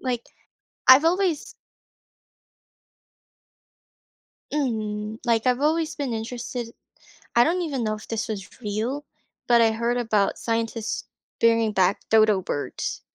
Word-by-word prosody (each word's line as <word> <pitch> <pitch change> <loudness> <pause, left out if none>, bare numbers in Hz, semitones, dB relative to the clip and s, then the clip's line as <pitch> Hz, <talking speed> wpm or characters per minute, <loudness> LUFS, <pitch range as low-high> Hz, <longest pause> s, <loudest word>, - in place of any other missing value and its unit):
Like, 245 -3 -2 0.6
I've 260 +4 +9
always 350 -2 0 3.0
Mhm, 220 -6 -2
like, 230 0 +1
I've 250 +1 +2
always 315 +2 +1
been 275 -5 -3
interested, 235 +1 -5 0.6
I 235 - +6
don't 355 +4 +1
even 275 -7 -2
know 215 - 0
if 215 - -10
this 225 -1 -2
was 205 +2 -7
real, 230 +7 -3 0.4
but 235 -1 +6
I 225 -1 +4
heard 235 +2 -1
about 215 -4 +1
scientists 230 -1 -2 0.4
bringing 230 -1 +3
back 190 0 +2
dodo 215 -3 +4
birds. 145 - -4
230 Hz, 120 wpm, -24 LUFS, 215-260 Hz, 3.0 s, I've